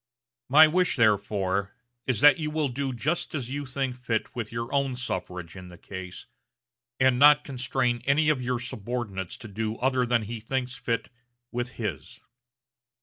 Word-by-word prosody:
My 155 +4 +9
wish, 180 +3 +2
therefore, 100 -3 +1 0.3
is 125 -5 0
that 145 +1 +7
you 155 -1 -2
will 150 -2 0
do 135 +2 -2
just 150 +7 -2
as 130 -4 -4
you 145 0 -4
think 130 -1 -2
fit 125 0 -3
with 115 -3 -4
your 115 +3 -4
own 140 -2 +1
suffrage 90 -7 -5
in 90 -1 -9
the 90 -1 -12
case, 95 -1 -8 0.7
and 130 -1 +4
not 150 +1 +7
constrain 125 -2 -1
any 150 +3 +3
of 145 -4 +2
your 125 0 -1
subordinates 110 -5 -4
to 115 - -10
do 110 +2 -3
other 130 -1 +1
than 120 -2 +2
as - - -8
he 115 0 -5
thinks 125 +2 -3
fit 115 -1 -2 0.4
with 125 +1 -3
his." 95 - -5
125 Hz, 170 wpm, -27 LUFS, 110-135 Hz, 0.7 s, My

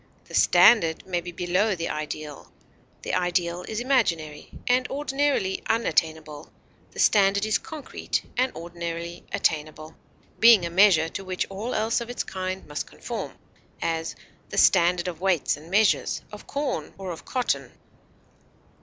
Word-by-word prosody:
The - - -15
standard 165 -9 +5
may 175 -2 -2
be 175 +1 -7
below 180 +4 0
the 170 -1 -3
ideal. 150 -1 -6 0.5
The - - -4
ideal 175 -1 0
is 220 - -3
imaginary, 170 - 0 0.2
and 250 +1 +2
ordinarily 275 -8 0
unattainable; 160 -8 -1 0.4
the - - -17
standard 200 0 +4
is 215 - +1
concrete, 305 -4 -4
and 255 +1 +1
ordinarily 170 0 -6
attainable, 155 0 -2 0.4
being 225 -6 +7
a 170 - -4
measure 180 -3 +5
to 195 - -6
which 185 -1 -2
all 210 +6 -4
else 225 +2 +1
of 235 - -6
its 245 - -3
kind 185 0 -5
must 150 0 -5
conform; - - -6 0.5
as, 165 0 -2 0.3
the - - -6
standard 175 +1 +4
of 175 -1 -5
weights 185 -5 +1
and 155 +3 -14
measures, 210 +3 +2
of 210 - -11
corn, 280 - -3
or 190 -2 -5
of 165 - -8
cotton. 250 -2 -2
180 Hz, 145 wpm, -25 LUFS, 165-220 Hz, 0.5 s, being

